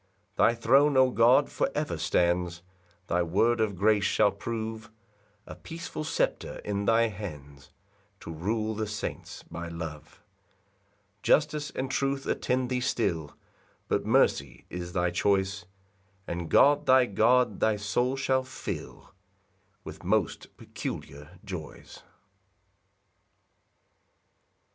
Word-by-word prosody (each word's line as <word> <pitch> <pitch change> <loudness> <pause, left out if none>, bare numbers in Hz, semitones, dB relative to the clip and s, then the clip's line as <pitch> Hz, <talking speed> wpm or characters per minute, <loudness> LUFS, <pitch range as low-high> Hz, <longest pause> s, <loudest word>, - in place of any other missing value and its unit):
4 - - +5
Thy 115 - +2
throne, 135 +5 +4
O 130 -1 +5
God, 120 +2 +5
for - - 0
ever - - -1
stands; 85 0 0 0.4
Thy 90 0 0
word 110 +7 +2
of 105 -3 0
grace 105 +2 +3
shall 105 +1 +3
prove 110 +2 -5 0.6
A - - -9
peaceful 165 -1 -7
sceptre 160 - -1
in 100 -1 -2
thy 115 +1 +3
hands, 75 -9 -9 0.5
To 85 - -7
rule 110 +7 -2
the 110 0 -3
saints 105 -1 -6
by 85 0 -7
love. 80 +2 -8 0.9
5 - - -42
Justice 150 -1 +2
and 130 0 -4
truth 135 0 -1
attend 125 0 -1
thee 125 - +1
still 85 -11 -1 0.5
But - - 0
mercy 70 -1 +1
is 90 0 -6
thy 90 -2 +1
choice; 95 +1 0 0.6
And 85 -1 -4
God, 145 +1 +5
thy 130 -1 +6
God, 115 +1 +2
thy 110 -1 +2
soul 120 +6 0
shall 130 -1 +1
fill 130 0 -7 0.7
With - - -10
most 100 0 -1
peculiar 75 +6 -7
joys. 90 -6 -8
105 Hz, 120 wpm, -28 LUFS, 90-125 Hz, 0.9 s, thy